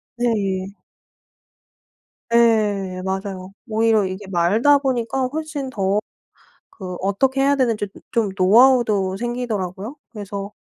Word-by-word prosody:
네. 200 -5 -1 1.6
예. 210 -5 +2
맞아요. 190 0 -4 0.2
오히려 220 -1 +2
이게 190 +2 -6
말다 200 +11 +3
보니까 255 -1 -1
훨씬 310 -3 -4
더 200 -4 0 0.8
그 185 -3 -6
어떻게 260 +8 +1
해야 280 +1 +3
되는지 230 -6 0
으 - - -10 0.2
좀 230 -4 +1
노하우도 210 -1 +4
생기더라고요. 225 -1 -4
그래서 200 -2 -6
215 Hz, 235 characters per minute, -21 LUFS, 195-245 Hz, 1.6 s, 노하우도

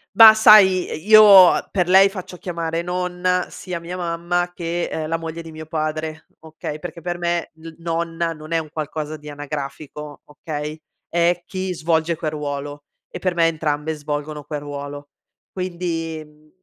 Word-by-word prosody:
Bah, 225 -1 +11
sai, 205 -4 +6
ehm, - - -4
io 205 -4 +8
per 180 -3 0
lei 190 +2 +6
faccio 185 -2 -8
chiamare 170 -2 -3
nonna 180 +1 -1
sia 180 -2 -6
mia 170 +2 -7
mamma 175 0 -2
che, 170 0 -3
ehm, 155 -1 -3
la 165 - -1
moglie 165 0 -6
di 165 -1 -11
mio 155 0 -8
padre, 155 0 -3
okay, 155 -1 -7
perché 175 +1 -8
per 175 +1 -4
me 170 -1 -2
n 165 0 -10
nonna 165 0 -2
non 155 0 -12
è 165 - +2
un 160 -2 -4
qualcosa 155 0 -4
di 150 -1 -11
anagrafico 145 0 -7
okay, 150 0 -6 0.3
é 175 +1 +1
chi 185 -1 -4
svolge 165 0 0
quel 155 -1 -3
ruolo, 145 -1 -5 0.3
e - - -7
per 185 -2 -1
me 165 -1 +4
entrambe 155 -1 -2
svolgono 150 0 -5
quel 150 +1 -5
ruolo. 145 0 -8 0.4
Quindi 170 -3 -4
mhmm, 150 0 -24
165 Hz, 165 wpm, -21 LUFS, 155-175 Hz, 0.4 s, Bah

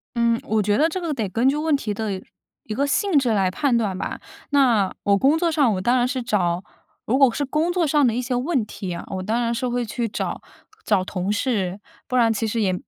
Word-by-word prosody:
嗯， 235 -1 +2
我 220 0 +1
觉 205 +1 +1
得 310 - +4
这 370 - -3
个 335 -4 -2
得 225 -7 -2
根 230 +7 +1
据 275 - +1
问 305 0 +1
题 215 -7 -3
的 200 -3 -3 0.4
一 215 - -5
个 275 +6 0
性 375 +3 +2
质 260 -3 0
来 195 -3 +2
判 245 +5 +1
断 205 -5 -1
吧。 - - -4 0.3
那 245 -9 +3
我 200 0 +3
工 275 +9 +3
作 335 0 +1
上 285 -8 +3
我 185 - -3
当 240 +6 +2
然 245 0 +2
是 255 0 -2
找 180 -5 0 0.4
如 250 - +1
果 270 -3 +5
是 285 - -1
工 305 +5 0
作 350 -1 +1
上 295 -1 +3
的 230 - +1
一 245 - -1
些 250 0 -2
问 255 -1 0
题 190 -3 -6
啊， 170 - -6
我 190 -1 -4
当 220 +5 0
然 235 0 0
是 245 +2 -2
会 245 0 -1
去 230 +2 -2
找 210 - -4 0.4
找 200 -4 +2
同 185 +1 -3
事， 205 -5 -1 0.3
不 255 - -3
然 235 -2 +4
其 225 +1 -1
实 225 +1 -1
也- 190 -3 +1
235 Hz, 265 characters per minute, -22 LUFS, 205-275 Hz, 0.4 s, 果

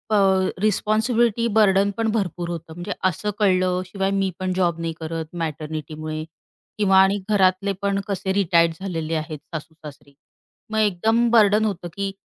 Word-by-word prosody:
अ, 190 -2 +3
responsibility, 220 +2 +1
burden 200 -1 +4
पण 225 -1 0
भरपूर 180 -5 -2
होतं, 165 -1 -6
म्हणजे 175 +4 -6 0.2
असं 210 +5 -3
कळलं. 185 -2 +2
शिवाय 195 +1 -2
मी 195 -1 0
पण 185 0 -1
जॉब 175 -3 0
नाही 165 -1 -2
करत 160 +1 -5
मॅटर्निटीमुळे 155 0 -5 0.5
किंवा 195 -2 +3
आणि 195 +1 +3
घरातले 195 0 +2
पण 200 0 0
कसे 190 -1 -2
रिटायर्ड 170 -4 +3
झालेले 165 -4 -3
आहेत 155 -1 -4
सासू-सासरे. 150 -3 -9 0.6
मग 220 - -1
एकदम 220 +4 +2
बर्डन 215 -1 +5
होतं 185 -4 -3
की 200 0 -3
190 Hz, 145 wpm, -22 LUFS, 165-205 Hz, 0.6 s, बर्डन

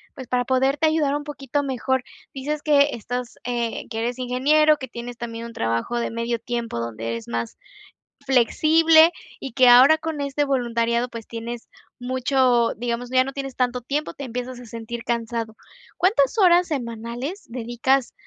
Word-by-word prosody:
pues, 260 -3 -9
para 245 -1 0
poderte 270 +4 +2
ayudar 300 -3 +1
un 290 - -3
poquito 285 -1 -3
mejor, 260 -1 -1 0.3
dices 290 +2 -3
que 290 -1 +4
estás 245 +2 -5
eh, 240 -2 -3
que 225 - -4
eres 240 +2 -2
ingeniero, 295 +5 +3
que 260 - -7
tienes 240 0 -8
también, 230 -1 -6
un 230 - -9
trabajo 115 - -1
de 235 - -2
medio 230 +1 -2
tiempo, 235 - -4
donde 115 0 -4
es 115 - -11
más 115 -1 -4 0.7
flexible, 315 +6 +5 0.3
y 270 - -6
que 255 -2 +6
ahora, 265 +6 +8
con 320 -2 -4
este 280 +1 -1
voluntariado, 235 -2 0
pues, 230 -2 -9
tienes 230 0 -6 0.3
mucho, 255 -1 +2
digamos, 240 +1 -3
ya 255 0 +4
no 270 - -5
tienes 270 -2 -5
tanto 250 -1 0
tiempo, 290 +5 -3
te 280 - -7
empiezas 250 0 -5
a 245 - -11
sentir 230 +1 -7
cansado, 230 -1 -3 0.4
¿cuántas 360 - +2
horas 355 -1 +5
semanales, 245 - -5
dedicas 245 +2 0
250 Hz, 165 wpm, -23 LUFS, 235-280 Hz, 0.7 s, ahora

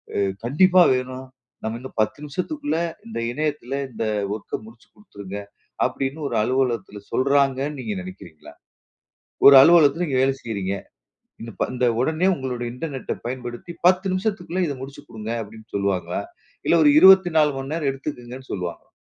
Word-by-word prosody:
அ - - 0 0.2
"கண்டிப்பா 180 +8 +5
வேணும். 130 +1 -5 0.4
நம்ம 110 +1 -3
இன்னும் 130 -1 -11
10 110 - -1
நிமிஷத்துக்குள்ள 290 - -3 0.3
இந்த 225 - -5
இணையத்தில 145 -1 -3
இந்த 115 -1 -4 0.3
ஒர்க்க 110 - -6
முடிச்சு 115 +1 -16
குடுத்துருங்க." 100 - -9 0.5
அப்பிடீன்னு 140 +3 -3
ஒரு 120 - -3
அலுவலகத்தில 120 -5 -1
சொல்றாங்கன்னு 140 +1 +1
நீங்க 210 - -3
நெனைக்கிறீங்களா? 90 - -12 0.9
ஒரு 140 - +11
அலுவலகத்தில 165 0 +5
நீங்க 130 -3 0
வேலை 135 0 +2
செய்றீங்க. 100 -4 -3 0.7
இன்ன 115 - -7
இப்ப - - -1
இந்த 125 0 +1
உடனே 160 +7 +1
உங்களுடைய 125 -3 -4
இன்டர்நெட்ட 135 0 -5
அ - - -29
பயன்படுத்தி 125 +5 -6 0.2
10 185 +1 +2
நிமிஷத்துக்குள்ள 185 -2 -2
இதை 145 - -3
முடிச்சுக் 135 +1 -10
குடுங்க." 110 +1 -6
அப்பிடீன்னு 110 +1 -13
சொல்லுவாங்களா? 95 -3 -1 0.5
இல்ல - - +4
ஒரு 145 - +7
24:00 175 -5 +7
மணி 135 +1 -5
நேரம் 150 -4 0
எடுத்துக்குங்கன்னு 130 -2 -8
சொல்லுவாங்களா? 90 -3 -5
135 Hz, 145 wpm, -23 LUFS, 115-160 Hz, 0.9 s, ஒரு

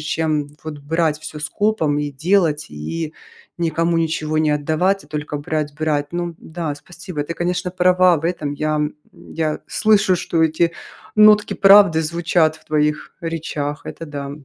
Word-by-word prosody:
чем 155 -2 -1
вот 155 -2 -7
брать 160 +1 0
всё 155 0 -8
скопом 160 -3 0
и 145 -1 -2
делать, 160 0 +1
и 150 - -5 0.4
никому 165 0 0
ничего 155 -1 -1
не 155 -1 +2
отдавать, 160 +7 +1
а - - -18
только 150 -1 -4
брать 150 0 -3
брать. 150 -2 -1
Ну 175 -1 -3
да, 160 -3 -5
спасибо. 170 +1 -7
Ты, 170 - -4
конечно, 180 +1 -2
права 180 -2 +4
в 160 - -9
этом. 155 -4 -2
Я, 155 +1 -1
м, 150 0 -1 0.2
я 155 -2 -4
слышу, 210 -3 +3
что 165 -1 0
эти 165 +1 +2 0.4
нотки 210 0 +6
правды 195 -5 +6
звучат 160 0 +1
в - - -23
твоих 150 0 0
речах, 150 -3 -4
это 165 - -7
да. 140 -1 -6
160 Hz, 160 wpm, -20 LUFS, 150-175 Hz, 0.4 s, нотки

